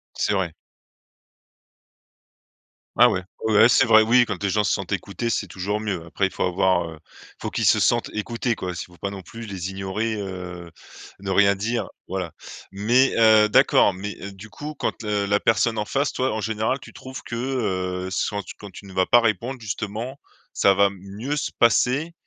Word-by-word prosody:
C'est - - 0
vrai. 95 -4 -1 2.4
Ah - - +7
ouais. 95 - -1 0.2
Ouais 110 -1 +1
ouais, 110 +3 +7
c'est 135 - +5
vrai, 110 -1 +7
oui 120 +3 +5
quand 105 -4 -5
les 100 - +1
gens 105 +2 +1
se 90 - +1
sentent 95 -2 -3
écoutés 100 +5 -3
c'est 105 - -1
toujours 100 +3 -3
mieux. 100 -6 -3
Après 95 +4 0
faut - - -5
avoir, 90 -1 +2
heu, 80 - -11 0.4
faut - - -3
qu'ils - - -2
se - - +5
sentent - - +2
écoutés 115 +3 -2
quoi 90 -1 -4
si 85 - -6
faut 90 - -19
pas 100 - -3
non 100 -1 -8
plus 115 +6 -10
les 95 -2 -5
ignorer, 95 +4 -3
heu, 90 -3 -7 0.5
ne 95 0 -5
rien 100 +1 +4
dire 115 +5 -2 0.2
voilà. 90 -4 -4 0.4
Mais, 120 +7 +3
heu, 110 -2 +6
d'accord, 100 -1 +4
mais, 100 +3 -6
heu, 100 - -7
du 100 +3 -12
coup 150 +9 -7
quand, 120 - -3
heu, 105 -1 0
la 100 +1 +2
personne 115 0 +2
en 105 - 0
face 140 +6 -1
toi 130 -2 -1
en 110 - -2
général 110 +5 -1
tu - - -13
trouves 130 0 -9
que, 115 - -6
heu, 95 -8 -2
soit, 100 +2 -1 0.2
quand 100 - -10
tu 95 +2 -12
ne 95 - -11
vas 95 0 +1
pas 120 - +6
répondre 120 +3 -1
justement, 110 +5 -5 0.3
ça 100 - +4
va 100 +1 +4
mieux 100 +9 -5
se 145 - -2
passer, 130 +7 +3
105 Hz, 195 wpm, -23 LUFS, 95-115 Hz, 2.4 s, Ah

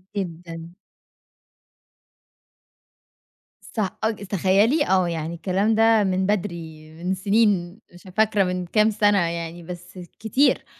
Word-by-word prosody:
جدًا. 170 -2 -6 3.0
صع 210 -5 0
آه 220 - +3
ج 215 -2 -6
تخيلي 200 - +2
آه، 185 -2 +3
يعني 165 0 -3
الكلام 195 +5 0
ده 225 -1 +4
من 190 0 0
بدري، 170 -6 -3
من 185 +1 0
سنين، 200 -1 +1
مش 175 - -15
فاكرة 215 -2 +3
من 180 -1 -2
كام 215 +4 +3
سنة 205 -1 +3
يعني 170 0 -3
بس 180 +1 -9 0.2
كتير. 240 +7 +2
190 Hz, 115 wpm, -23 LUFS, 175-210 Hz, 3.0 s, ده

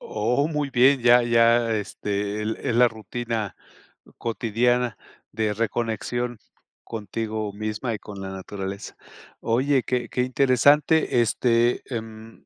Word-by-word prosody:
Oh, 125 +8 0
muy 150 -3 -2
bien, 130 +2 +4
ya 120 0 +6
ya, 115 0 +3
este, 105 0 -3 0.3
es 115 - 0
la 125 0 +6
rutina 110 -1 -4 0.6
cotidiana 120 +1 0 0.3
de 110 -1 -1
reconexión 115 +1 -2 0.4
contigo 110 0 -4
misma 110 +3 -3
y 105 - -5
con 100 -1 -9
la 95 - -5
naturaleza. 95 +1 -6 0.5
Oye, 130 +3 +1
qué 125 -1 -2
qué 125 - -1
interesante, 135 +2 +3
este, 120 +1 +2
em. 110 0 -8
115 Hz, 115 wpm, -24 LUFS, 105-125 Hz, 0.6 s, ya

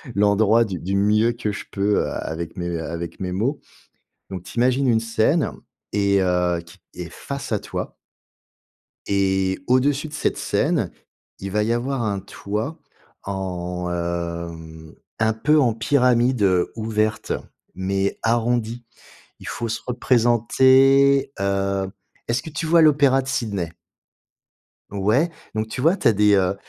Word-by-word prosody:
l'endroit 105 +3 +4
du 95 -4 -5
du 95 +3 -2
mieux 105 +3 +3
que 115 -3 -3
je - - -6
peux 100 +1 +1
a - - -5
avec 80 +1 -5
mes 85 -1 -2
avec 85 +2 -6
mes 90 - -2
mots. 120 +11 -1 0.7
Donc, 95 -2 -6
tu - - -11
imagines 130 +2 +2
une 115 -2 +4
scène 115 +8 +1 0.4
et, 100 -1 +2
heu, 90 -1 +1
qui 85 +3 -16 0.2
est 85 -2 -6
face 140 -2 -6
à 105 - +1
toi. - - -6 1.1
Et 95 -1 +1
au-dessus 140 +4 +2
de - - -14
cette 155 - -1
scène, - - 0 0.5
il 95 - -5
va 105 +2 +1
y 115 - 0
avoir 125 +2 -1
un 100 -3 -1
toit 105 - -5 0.5
en, 90 -2 -4
hem, 85 -2 -5 0.2
un 110 0 +2
peu 150 +8 +2
en 120 -5 +2
pyramide, 125 -1 +2
heu, 90 -3 +2
ouverte 110 -1 -1 0.4
mais 95 +1 -1
arrondie. 120 0 0 0.5
Il - - -12
faut 115 - -3
se 110 - -3
représenter, 130 +3 +4
heu 100 0 0 0.4
est-ce 120 +2 0
que 160 - -8
tu 155 +2 -4
vois 165 +1 +5
l'opéra 140 -3 +4
de 130 - -9
Sydney? 100 -10 -2 1.2
Ouais, 105 - +1 0.2
donc 110 0 -2
tu 125 - -5
vois, 165 +8 +3
tu 130 - +2
as - - +5
des, 105 0 +4
heu, 95 -1 +2
110 Hz, 150 wpm, -22 LUFS, 95-125 Hz, 1.2 s, vois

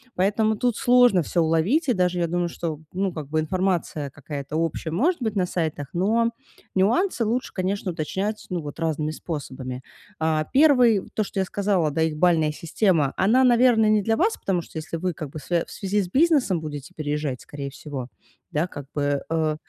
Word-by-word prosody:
Поэтому 215 +3 +2
тут 245 -1 +1
сложно 245 -7 +5
всё 170 - 0
уловить. 165 - +2
И - - +5
даже 180 -3 +1
я 170 - +1
думаю, 175 +1 -1
что, 160 -3 -4
ну 190 0 -1
как 155 -4 -6
бы, 155 +1 +1
информация 170 -3 -1
какая-то 145 +1 -7
общая 165 0 -2
может 290 - +1
быть 220 -3 -1
на 185 -2 +2
сайтах, 160 -5 -2
но 225 +6 +2 0.4
нюансы 230 - +2
лучше, 240 +4 -1
конечно, 190 0 -2
уточнять, 190 +6 -3
ну, 180 -3 -2
вот 145 0 -8
разными 155 -2 -1
способами. 130 -5 -6 0.4
А, 160 -1 +1
1, 250 -8 +5
то, 215 - +2
что 195 - -4
я 190 - +1
сказала, 190 -5 0
да, 160 +3 -1
их 160 -1 0
балльная 160 -2 +3
система, 165 -3 +1
она, 230 +7 +4
наверное, 240 -3 +5
не 215 -1 +4
для 225 +2 +2
вас. 430 +5 +2
Потому 185 -3 -1
что 165 - -11
если 160 +1 -5
вы, 180 +1 -2
как 155 -2 -6
бы, 155 - -7
свя 170 +4 -1
в - - -15
связи 200 +1 -1
с 185 - -3
бизнесом 270 - +3
будете 150 +2 -7
переезжать, 150 -3 -3
скорее 140 -1 -6
всего, 140 -3 -6 0.4
да, 155 +4 0
как 145 -6 -8
бы, 145 -1 0
э 160 -1 +1
175 Hz, 190 wpm, -24 LUFS, 155-215 Hz, 0.4 s, сложно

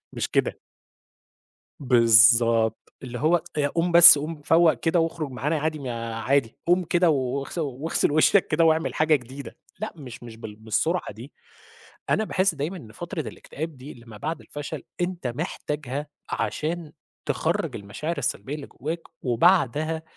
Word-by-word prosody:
مش - - -2
كده. - - 0 1.2
بالضبط، 115 -2 +4
اللي 125 -1 -6
هو 165 +2 +2 0.2
"يا 145 -1 +2
قوم 170 +4 -1
بس، 170 -2 +10
قوم 150 +1 -5
فوّق 160 +2 +4
كده، 165 +1 0
واخرج 165 -3 -2
معانا 150 +5 -2
عادي، 155 +1 -2
ما 135 -3 -6
يا 115 -1 -5
عادي، 130 +1 0
قوم 180 +2 +3
كده، 175 +1 +2
واغس 140 +1 -2
واغسل 150 0 -1
وشّك 155 +6 +4
كده، 160 +2 +2
واعمل 160 0 +2
حاجة 155 0 +3
جديدة." 130 -1 -8 0.2
لأ، 215 - -5
مش 130 -7 -11
مش 115 -2 -10
بال 110 -2 -9
بالسرعة 110 +11 -1
دي، 115 +7 -12 0.8
أنا 220 - +2
باحس 190 -3 +1
دايمًا 155 +6 -4
إن 115 -11 -12
فترة 175 - -6
الإكتئاب 155 0 -7
دي، 130 +4 -10
اللي 115 0 -16
ما 110 - -11
بعد 155 +9 -4
الفشل، 145 -1 -7 0.2
أنت 175 -4 -3
محتاجها، 145 +3 -4 0.2
عشان 160 0 -3 0.3
تخرّج - - -1
المشاعر 145 +12 -5
السلبية 140 +1 -3
اللي 150 -2 -7
جوّاك، 160 +6 -5 0.2
وبعدها 155 +3 +2
150 Hz, 155 wpm, -24 LUFS, 125-165 Hz, 1.2 s, بس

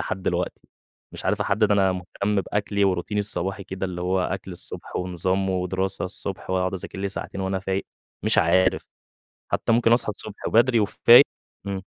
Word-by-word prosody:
لحد 95 - -4
دلوقتي، - - -2 0.5
مش - - -8
عارف 105 +2 0
أحدِّد 105 +1 +2
أنا 95 -2 +3
مهتم 100 +3 -2
بأكلي 100 +1 -1
وروتيني 95 +2 0
الصباحي 100 -1 -2
كده، 95 0 -4
اللي 90 -1 -6
هو 90 +1 +1
أكْل 95 +1 -3
الصبح 85 - -6
ونظام 95 +2 0
ودراسة 95 +1 -1
الصبح 95 0 -4
وأقعد 95 0 0
أذاكر 95 +1 -7
لي 100 0 -1
ساعتين 100 0 -5
وأنا 95 0 -1
فايق، 95 +1 -3 0.4
مش - - +3
عارف، 95 0 +3 0.7
حتى - - 0
ممكن 115 0 +4
أصحى 120 -2 +2
الصبح 105 0 -5
وبدري 120 +1 +4
وفايق 115 +5 +7 0.4
إمم. 100 -1 -3
95 Hz, 165 wpm, -24 LUFS, 95-105 Hz, 0.7 s, وفايق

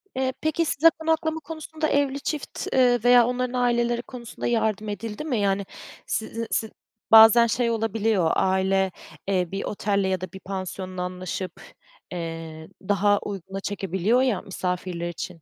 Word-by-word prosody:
Eee, 260 0 0
peki, 315 +2 +1
size 320 +2 +5
konaklama 320 0 0
konusunda 315 0 -4
evli 280 -2 +1
çift, 295 0 -4
ııı, 250 -2 +4
veya 245 -1 +6
onların 250 0 -2
aileleri 240 -1 +1
konusunda 240 -1 -7
yardım 220 -3 0
edildi 210 +5 -5
mi? 265 -8 -1
Yani, 200 0 +1 0.4
sizi 230 +1 -3
si 220 - -1 0.4
bazen 225 +1 +9
şey 235 +1 +1
olabiliyor, 220 -5 +1
aile, 190 0 +2 0.4
eee, 185 -3 +1
bir 195 0 -3
otelle 200 -1 -1
ya 185 -1 -1
da 185 - -4
bir 190 - -8
pansiyonla 185 -1 -5
anlaşıp, 180 +1 -5 0.5
eee, 165 -2 -6 0.2
daha 205 0 +3
uyguna 195 -1 -6
çekebiliyor, 200 +4 0
ya, 250 -8 +1
misafirler 180 -2 -3
için 175 0 -7
210 Hz, 145 wpm, -25 LUFS, 190-245 Hz, 0.5 s, bazen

